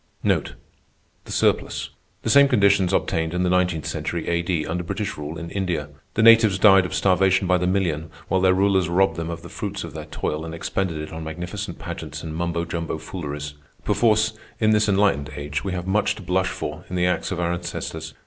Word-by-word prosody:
The - - -2 0.6
same 140 0 +6
conditions 100 -7 +3
obtained 80 -3 0
in 90 - +1
the 90 - +1
nineteenth 90 -4 +1
century 85 -2 -3
A.D. 85 -2 0
under 85 +2 -2
British 105 +5 -3
rule 75 +2 -6
in 85 +2 -7
India. 90 -7 -2 0.3
The 110 - +2
natives 115 -4 +7
died 95 -1 +6
of - - -5
starvation 95 0 +3
by 90 0 +3
the 90 - 0
million, 85 -5 0 0.2
while 95 -1 +1
their 95 0 +4
rulers 95 -2 +2
robbed 85 -1 +3
them 85 0 -4
of 85 -1 -6
the - - -8
fruits - - -5
of - - -8
their - - -6
toil 75 +1 -3
and 80 0 -6
expended 85 0 -2
it 75 +1 -6
on 80 0 -6
magnificent 85 +3 -5
pageants - - -7
and 80 -1 -5
mumbo 85 0 -1
jumbo 85 -2 -3
fooleries. 75 -3 -6 0.3
Perforce, 110 -1 +3 0.3
in 110 -1 +3
this 105 0 +3
enlightened 95 -8 +2
age, 75 +1 -4
we 95 - -3
have 90 -1 -3
much 100 +3 +1
to 105 - -10
blush 95 +1 +1
for 80 0 -5
in 90 - -4
the 90 0 +2
acts 90 +1 0
of 90 - -2
our 85 0 0
ancestors. 80 -2 -5
90 Hz, 195 wpm, -23 LUFS, 80-95 Hz, 0.6 s, natives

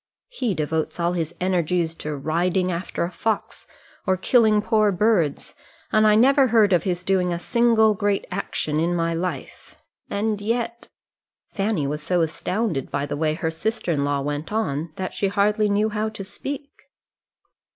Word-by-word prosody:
He 250 - -2
devotes 160 +2 -2
all 170 +1 +1
his 170 -1 -3
energies 175 -2 0
to 150 -2 -5
riding 175 +6 0
after 170 0 -3
a 170 - -3
fox 220 +3 -3 0.4
or 185 0 +3
killing 215 +2 +4
poor 215 -1 +2
birds, 185 -6 +1 0.4
and 215 0 +4
I 210 - +5
never 265 +4 +5
heard 215 -4 +4
of 175 - +4
his 180 -2 -2
doing 185 -2 +1
a 170 - -1
single 225 +2 +3
great 205 0 0
action 155 -5 -2
in 170 +2 +1
my 165 -1 0
life. 165 -4 -5 0.3
And 210 0 -1
yet 235 +2 -2 0.3
" - - -49
Fanny 200 -7 0
was 150 +2 -3
so 175 +3 +1
astounded 165 - -2
by 140 - -1
the 145 0 -4
way 155 +1 0
her 160 -1 -2
sister 210 +3 -2
in 145 -3 0
law 145 0 0
went 145 +4 -4
on, 160 -7 -2
that 185 -1 -4
she 200 - 0
hardly 210 +1 +2
knew 210 +2 +2
how 215 +1 -1
to 215 -2 -8
speak. 275 +8 -6
185 Hz, 170 wpm, -23 LUFS, 165-215 Hz, 0.4 s, I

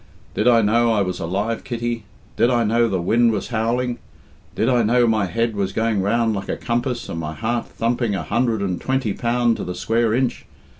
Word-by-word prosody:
Did - - 0
I 115 -2 +5
know 115 +3 +3
I 105 -3 +2
was 90 -1 -3
alive, 100 +7 -2
Kitty? 120 -2 -3 0.3
Did 120 - +3
I 120 -2 +2
know 115 +2 +2
the 95 -4 -1
wind 115 +7 +3
was 105 -3 -3
howling? 120 +2 -1 0.6
Did 110 - +1
I 125 -2 +3
know 120 +2 +3
my 110 -4 +1
head 115 +2 -1
was 95 -1 -2
going 110 -3 +1
round 115 +3 +1
like 100 -1 -5
a - - -2
compass, 120 +1 -2
and 80 - -5
my 80 -1 -5
heart 115 +4 -2
thumping 115 -2 -1
a 85 - -3
hundred 115 - 0
and 90 -3 -2
twenty 130 -6 0
pound 120 0 +1
to - - -4
the 90 0 -5
square 115 0 +1
inch? 125 -1 -1
115 Hz, 210 wpm, -21 LUFS, 105-120 Hz, 0.6 s, I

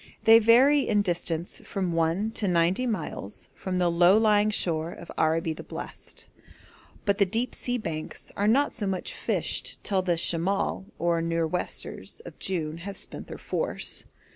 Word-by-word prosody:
They 225 0 +8
vary 250 +6 +6
in 210 -2 +3
distance 170 -2 -2
from 185 -3 -2
one 165 +6 +1
to 215 -2 -2
ninety 180 +7 +2
miles 165 - -5
from 185 -1 -4
the 175 -1 +2
low 175 +4 +5
lying 215 -1 +4
shore 165 -5 +1
of 170 - -10
'Araby 160 +1 +1
the - - -9
Blest,' - - -9 0.8
but 200 -2 +1
the 200 - +6
deep 230 +6 -1
sea 245 0 -1
banks 160 -8 -5
are 205 - +1
not 275 +6 +3
so 210 -5 -3
much 190 -2 -3
fished - - -2
till 195 -2 +1
the 175 -2 0
'Shemal' 180 +4 +1
or 170 0 +1
nor'westers 165 - -3
of - - -11
June 165 -4 -2
have 195 +3 -6
spent - - -7
their - - -7
force. - - -3
185 Hz, 165 wpm, -27 LUFS, 165-210 Hz, 0.8 s, They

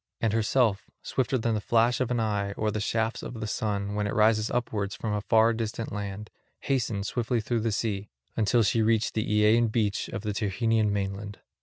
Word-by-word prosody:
And 110 -2 0
herself, 110 -3 +1
swifter 130 0 0
than 115 -1 0
the 105 - -1
flash 115 +3 +2
of 125 - 0
an 125 -1 0
eye 105 -2 -1
or 105 +1 -1
the 110 - -2
shafts 110 +2 -1
of - - -7
the 110 - -3
sun, 105 -2 -2
when 105 0 -1
it - - -3
rises 110 0 +3
upwards 105 -5 -2
from 110 -2 -3
a 105 - -1
far 110 +2 +4
distant 115 0 -4
land, 105 0 -5 0.3
hastened 120 -7 -1
swiftly 120 +1 -1
through 115 +2 -1
the 115 0 0
sea, 105 -2 -2 0.3
until 115 +2 +3
she 110 +2 +2
reached 110 0 +2
the 110 - -1
Aeaean 105 +2 +4
beach 105 -3 0
of 100 - -5
the 105 -1 -2
Tyrrhenian 110 +1 +1
mainland. 100 0 -3
110 Hz, 200 wpm, -27 LUFS, 105-115 Hz, 0.3 s, far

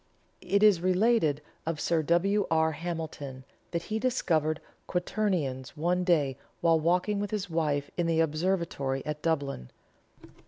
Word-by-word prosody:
It 200 +3 +1
is 205 -5 +6
related 185 -5 +2 0.2
of 160 -1 -3
Sir 165 +1 +1
W. 185 +6 +2
R. 160 0 +3
Hamilton 155 -5 -5 0.2
that 170 -1 -2
he 220 +1 -2
discovered 160 - +1 0.3
quarternions 175 -9 -1
one 175 +3 +1
day 145 -7 +2 0.2
while 165 -1 +4
walking 180 +5 +1
with 205 0 -2
his 200 -3 -3
wife 150 -3 0
in 175 -1 +1
the 165 -1 +2
observatory 160 -4 0
at 150 0 -4
Dublin. 140 - -1
165 Hz, 135 wpm, -29 LUFS, 150-185 Hz, 0.3 s, is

